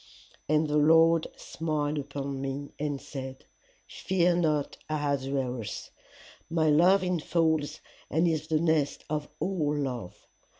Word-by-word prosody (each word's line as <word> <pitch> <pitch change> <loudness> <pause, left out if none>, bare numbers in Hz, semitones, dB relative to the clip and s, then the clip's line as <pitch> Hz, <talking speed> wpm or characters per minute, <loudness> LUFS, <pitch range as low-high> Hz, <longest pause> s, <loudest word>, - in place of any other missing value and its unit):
And 155 +1 +3
the 150 0 +1
Lord 165 +2 +5
smiled 150 -2 -2
upon 140 -1 -4
me 135 +1 -4
and 145 -2 -2
said, 135 -2 -8 0.4
Fear 180 -2 +1
not, 155 -4 0
Ahasuerus; 135 -5 -2 0.6
my 160 -2 +2
love 180 +5 +5
infolds 165 -3 0 0.3
and 165 +3 +2
is 155 -2 -1
the 155 -1 +2
nest 160 -3 +1
of 150 -1 -2
all 155 -6 0
love. 125 -10 -4
150 Hz, 120 wpm, -28 LUFS, 140-160 Hz, 0.6 s, Lord